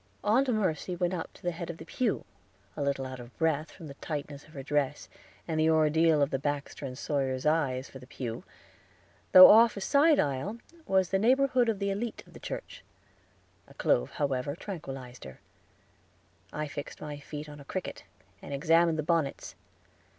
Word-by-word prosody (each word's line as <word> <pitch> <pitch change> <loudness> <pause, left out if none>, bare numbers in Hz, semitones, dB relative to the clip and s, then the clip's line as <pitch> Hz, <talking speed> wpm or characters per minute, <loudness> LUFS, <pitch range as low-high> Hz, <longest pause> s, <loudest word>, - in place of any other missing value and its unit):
Aunt 250 +6 +3
Mercy 185 -5 -1
went 175 +1 -1
up 170 -3 -4
to - - -19
the 175 - 0
head 170 0 -6
of 170 - -6
the 160 - -10
pew, 235 +4 -1 0.5
a 150 - -5
little 140 -1 -1
out 130 -1 -7
of 120 0 -12
breath, 160 -1 0
from 165 - -12
the 140 - -8
tightness 145 -2 -5
of 155 - -19
her 135 - -7
dress, 145 0 -1 0.4
and 160 -2 -1
the 160 +1 +4
ordeal 160 -1 +4
of 140 - -1
the 135 - -1
Baxter 145 0 -3
and 125 -1 -8
Sawyer 135 -3 -1
eyes, 140 -4 +1
for 135 - -11
the 125 - -14
pew, 120 -4 -6 0.9
though 185 0 +11
off 225 0 +6
a - - -4
side 290 +7 +4
aisle, 145 - -1 0.3
was 190 -1 +2
in 195 - +3
the 220 - +2
neighborhood 255 -2 +3
of 220 - 0
the 200 0 -1
elite 220 +3 -4
of - - -19
the - - -11
church; - - -7 0.8
a - - -17
clove, - - +1
however, 140 -1 -1
tranquilized 135 -10 -8
her. 65 -1 -11 1.1
I 150 0 -3
fixed 145 0 -7
my 150 -1 -7
feet 150 +1 -8
on 145 0 -10
a - - -11
cricket, 185 +6 -5 0.4
and 140 - -5
examined 165 +2 +3
the 155 - -1
bonnets. 165 -3 -1
155 Hz, 190 wpm, -29 LUFS, 140-185 Hz, 1.1 s, though